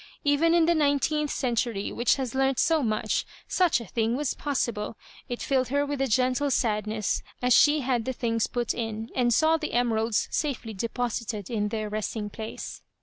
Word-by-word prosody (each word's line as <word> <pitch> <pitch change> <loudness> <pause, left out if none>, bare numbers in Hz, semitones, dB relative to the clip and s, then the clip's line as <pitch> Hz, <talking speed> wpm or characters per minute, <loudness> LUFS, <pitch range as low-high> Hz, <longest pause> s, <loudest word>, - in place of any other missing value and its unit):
Even 310 +3 +3
in 335 -2 +5
the 340 - +4
nineteenth 300 0 +1
century, 235 -6 -1
which 240 - +2
has 260 -4 -3
learnt 270 -1 +1
so 320 -2 +3
much, 215 -4 0 0.2
such 360 -7 +2
a 235 - -8
thing 225 +3 0
was 290 0 -1
possible! 235 -7 -2 0.3
It 245 - -4
filled 260 -2 +1
her 285 +2 +1
with 285 -1 -3
a 270 - +2
gentle 255 +4 +2
sadness 215 -4 0 0.2
as 250 0 +3
she 295 +4 +5
had 245 -3 0
the 260 - -1
things 230 -2 0
put 240 -2 -1
in, 225 -1 -4
and 245 -2 +2
saw 315 +7 +4
the 305 -1 -5
emeralds 225 -2 +1
safely 260 -7 -2
deposit 230 +1 -2
ed 205 -1 -7
in 210 -3 0
their 215 0 -3
resting 210 0 -3
place. 220 +1 -7
245 Hz, 185 wpm, -27 LUFS, 220-285 Hz, 0.3 s, in